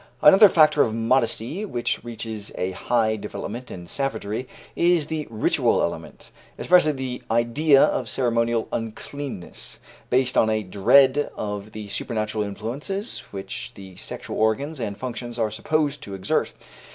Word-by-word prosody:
Another 195 +7 +9
factor 155 -3 +5
of 110 -2 +1
modesty, 115 - 0
which 120 - -2
reaches 110 -3 -6
a 90 +1 -1
high 110 +3 +1
development 110 +4 -6
in 90 -1 -8
savagery, 125 +2 -3 0.3
is 170 -3 +3
the 155 -1 -4
ritual 110 -1 +2
element, - - -5 0.3
especially 175 -4 +4
the 130 -2 -5
idea 135 +6 +4
of - - 0
ceremonial 115 -2 +1
uncleanness, 115 -1 -6 0.3
based 130 +1 +3
on 110 - +3
a 110 0 0
dread 130 +9 +4
of 105 0 -5
the 105 -1 -7
supernatural 110 +1 -2
influences 125 - -4
which 95 -1 -6
the 95 -2 -11
sexual - - -6
organs 135 +8 0
and 105 -4 -4
functions 120 -1 -5
are 110 -2 0
supposed 145 +5 -1
to 100 - -7
exert. 95 0 0
115 Hz, 140 wpm, -24 LUFS, 110-140 Hz, 0.3 s, Another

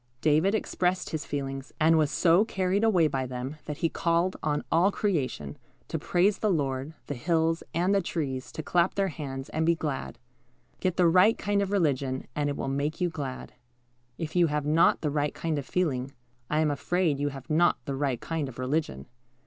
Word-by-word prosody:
David 160 +7 +3
expressed 185 -3 -1
his 155 -2 -4
feelings, 135 -1 -4
and 160 +1 +5
was 155 -2 +3
so 170 +5 +4
carried 190 -1 0
away 185 -8 +4
by 135 -3 -2
them 130 +4 -5
that 150 -1 -5
he - - +6
called 170 +3 0
on 150 -1 -1
all 175 +5 +4
creation 130 - -2 0.3
to - - -2
praise 190 +4 +2
the 215 - +1
Lord, 140 -3 -1
the - - -4
hills 165 +4 +1
and 180 +4 +1
the 200 - +3
trees 135 -7 -3
to 155 - -5
clap 175 +3 +2
their 195 -1 +1
hands 135 -5 -6
and 160 - -1
be 170 +1 +3
glad. 150 -4 -4 0.6
Get 185 -2 -1
the 180 -2 +5
right 185 +6 +5
kind 205 0 0
of 200 - -1
religion, 140 -8 0
and 145 -1 0
it 140 - -3
will - - -3
make 140 +4 -2
you 180 -2 0
glad. 140 -5 -6 0.6
If 160 0 -5
you 175 -1 +5
have 150 -1 -1
not 155 +3 +4
the 150 -2 -1
right 145 0 -1
kind 160 -3 -1
of 140 - -7
feeling, 135 -7 -1 0.4
I 155 +1 +2
am 155 -2 +2
afraid 160 0 0
you. 145 0 0
have 135 -2 -9
not 170 +3 +3
the 140 - -3
right 135 -3 -1
kind 160 -2 -3
of 120 - -12
religion. 130 - -2
155 Hz, 200 wpm, -28 LUFS, 140-175 Hz, 0.6 s, he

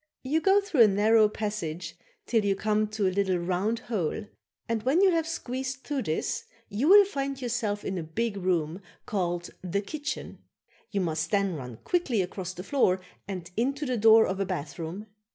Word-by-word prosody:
"You 300 +5 +1
go 390 +4 +5
through 350 - +2
a 225 - +9
narrow 210 +2 +4
passage 205 -6 -4 0.3
till 225 -3 +2
you 200 -1 +2
come 215 +1 +1
to 215 -1 -2
a 185 - 0
little 190 -2 +1
round 185 +6 0
hole 210 -2 -2 0.4
and 230 -1 -1
when 265 +9 +2
you 390 -1 +6
have 330 -2 +1
squeezed 265 -4 -4
through 290 -3 -2
this 160 -8 -2 0.2
you 220 +8 0
will 405 +1 +9
find 275 -7 -3
yourself 230 -5 -2
in 190 -2 -2
a - - -4
big 200 +8 -2
room 180 -2 -1 0.2
called 175 -3 -2
a 185 +2 -1
kitchen. 295 +7 -5 0.5
You 200 -2 -1
must 160 -2 -1
then 200 -2 +1
run 125 -7 -7
quickly 270 - +1
across 185 0 -5
the 180 - -7
floor 195 -6 +2 0.3
and 180 -3 -6
into 275 +6 0
the 255 -2 0
door 225 0 +7
of 190 +1 -2
a 195 - +1
bathroom. 170 +3 -5
210 Hz, 185 wpm, -28 LUFS, 185-255 Hz, 0.5 s, a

